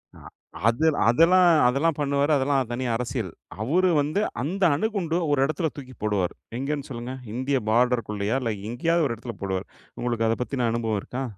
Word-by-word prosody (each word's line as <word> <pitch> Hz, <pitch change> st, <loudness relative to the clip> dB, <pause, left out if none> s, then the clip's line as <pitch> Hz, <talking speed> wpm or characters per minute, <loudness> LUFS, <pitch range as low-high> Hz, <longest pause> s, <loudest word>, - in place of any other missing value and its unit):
அ -, -, -14 dB, 0.5 s
அதெல் 150 Hz, +6 st, +2 dB
அதெல்லாம் 170 Hz, +9 st, +5 dB, 0.2 s
அதெல்லாம் 140 Hz, +5 st, +1 dB
பண்ணுவாரு. 140 Hz, +1 st, +1 dB
அதெல்லாம் 135 Hz, -2 st, +1 dB
தனி 125 Hz, +2 st, -2 dB
அரசியல். 115 Hz, -5 st, -3 dB, 0.3 s
அவரு 175 Hz, +11 st, +2 dB
வந்து 155 Hz, +8 st, 0 dB, 0.2 s
அந்த 185 Hz, +9 st, -2 dB
அணுகுண்டு 180 Hz, -2 st, -1 dB
ஒரு 145 Hz, -, +2 dB
இடத்துல 155 Hz, +3 st, -1 dB
தூக்கி 130 Hz, -2 st, -9 dB
போடுவாரு. 100 Hz, -4 st, 0 dB, 0.3 s
எங்கன்னு 140 Hz, +1 st, -3 dB
சொல்லுங்க 120 Hz, 0 st, -5 dB, 0.2 s
இந்திய 130 Hz, +3 st, 0 dB
பார்டர் 120 Hz, 0 st, +2 dB
குள்ளயா 105 Hz, +3 st, -1 dB
இல்ல 115 Hz, -3 st, -1 dB, 0.2 s
எங்கயாவது 165 Hz, +7 st, +1 dB
ஒரு 120 Hz, -, -2 dB
இடத்துல 115 Hz, 0 st, -7 dB
போடுவார். 95 Hz, -1 st, -3 dB, 0.3 s
உங்களுக்கு 120 Hz, -2 st, 0 dB
அதை 115 Hz, -, +1 dB
பத்தின 125 Hz, -2 st, -1 dB
அனுபவம் 115 Hz, -2 st, -1 dB
இருக்கா? 130 Hz, +6 st, -5 dB
130 Hz, 165 wpm, -25 LUFS, 115-150 Hz, 0.5 s, அதெல்லாம்